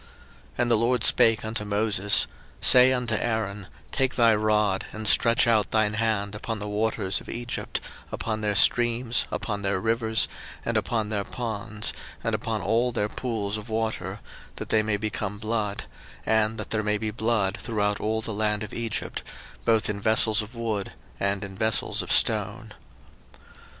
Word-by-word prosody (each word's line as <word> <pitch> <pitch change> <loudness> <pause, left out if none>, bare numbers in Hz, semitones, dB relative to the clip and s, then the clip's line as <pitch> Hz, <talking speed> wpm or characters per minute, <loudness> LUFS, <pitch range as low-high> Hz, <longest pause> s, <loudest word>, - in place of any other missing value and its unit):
02:007:019 - - -23 0.5
And 120 0 +1
the 115 - +5
LORD 120 +3 +1
spake 115 -1 +5
unto 110 0 -3
Moses, 105 -1 +2 0.3
Say 125 +1 +7
unto 125 -3 0
Aaron, 105 -3 -2 0.2
Take 130 -2 +1
thy 115 -2 +5
rod, 105 -2 +1
and 110 0 -5
stretch 115 0 +6
out 110 -4 +2
thine 110 -1 +1
hand 105 -2 -1
upon 110 +2 -4
the 105 0 -6
waters 105 -2 -1
of - - -13
Egypt, 120 0 -4 0.3
upon 110 -1 -3
their 105 -1 0
streams, 120 +1 +3
upon 105 -3 -3
their 95 -1 0
rivers, 110 +1 +1 0.4
and - - -1
upon 110 -3 -1
their 105 -2 -1
ponds, 110 -2 -3 0.3
and - - -1
upon 110 -4 -2
all 115 +5 +1
their 105 -2 -1
pools 110 -5 -3
of 105 +2 -9
water, 110 -3 -3 0.3
that - - -7
they 110 - +3
may 105 -1 0
become 105 -1 -3
blood; 110 -2 -2 0.4
and 110 0 +1
that - - -7
there 110 - +1
may 105 0 0
be 110 +1 -3
blood 110 -3 0
throughout 105 -3 -1
all 110 +1 -1
the 110 - -4
land 105 0 0
of 105 - -8
Egypt, 115 -2 -4 0.4
both 115 -2 +3
in 100 -1 -3
vessels 110 +1 +4
of 105 +4 -10
wood, 110 -4 -3 0.3
and 100 +1 -1
in 100 -1 -8
vessels 110 +3 0
of - - -5
stone. - - +2
110 Hz, 170 wpm, -26 LUFS, 105-115 Hz, 0.5 s, Say